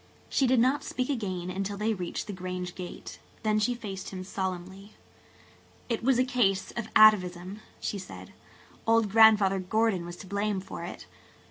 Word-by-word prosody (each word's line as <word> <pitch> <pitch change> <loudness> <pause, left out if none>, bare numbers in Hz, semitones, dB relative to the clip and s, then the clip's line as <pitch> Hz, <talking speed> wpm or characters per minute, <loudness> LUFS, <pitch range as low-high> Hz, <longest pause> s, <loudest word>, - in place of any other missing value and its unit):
She 270 - +2
did 250 -1 +4
not 260 +4 +2
speak 255 +2 -2
again 185 -8 -3
until 195 +2 -3
they 215 +2 0
reached 180 -4 -4
the 210 - -6
Grange 180 -1 -5
gate. 180 -1 -8 0.2
Then 215 -1 +2
she 240 +4 +1
faced 200 -5 -6
him 185 -1 -6
solemnly. 190 +2 -5 1.0
"It 230 - -1
was 260 0 +3
a 255 - +3
case 235 -7 +1
of 235 - -5
atavism," 190 -3 +5 0.2
she 200 - -3
said. 185 - -10 0.5
"Old 225 -2 +3
Grandfather 210 -3 +6
Gordon 200 0 +1
was 175 0 -7
to 190 - -11
blame 200 +1 -1
for 185 -2 -8
it." 175 - -8
200 Hz, 165 wpm, -28 LUFS, 185-225 Hz, 1.0 s, Grandfather